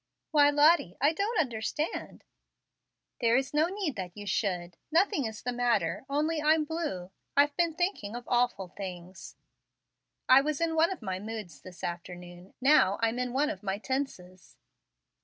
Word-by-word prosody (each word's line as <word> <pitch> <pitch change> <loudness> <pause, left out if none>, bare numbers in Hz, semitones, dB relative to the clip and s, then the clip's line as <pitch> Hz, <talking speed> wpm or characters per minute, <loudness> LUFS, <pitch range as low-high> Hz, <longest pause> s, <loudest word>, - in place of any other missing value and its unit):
"Why, 290 -2 +6
Lottie, 290 - +4
I 290 +4 +3
don't 405 +4 -1
understand 265 +3 -3 0.5
" - - -57
"There 235 0 +4
is 265 +2 -2
no 305 +2 +3
need 370 - -3
that 180 0 -6
you 205 - -7
should. 180 -4 -2 0.2
Nothing 335 - +2
is 220 -1 -6
the 250 - -1
matter 240 -5 0
only 305 +3 0
I'm 310 +1 +4
blue 295 - -4 0.3
I've 285 0 +4
been 335 -1 +1
thinking 350 - -2
of 240 0 -7
awful 240 -6 +1
things. 185 -1 -8 0.9
I 260 +1 +8
was 300 0 -2
in 335 -1 0
one 320 +1 +4
of 365 -11 -6
my 190 -2 -3
moods 210 -5 -7
this 180 -1 -13
afternoon, 175 +1 -7
now 250 -8 +4
I'm 230 +2 +1
in 250 -1 -2
one 290 +4 +1
of - - -8
my 195 -1 -2
tenses." 195 -8 -5
245 Hz, 165 wpm, -29 LUFS, 190-305 Hz, 0.9 s, I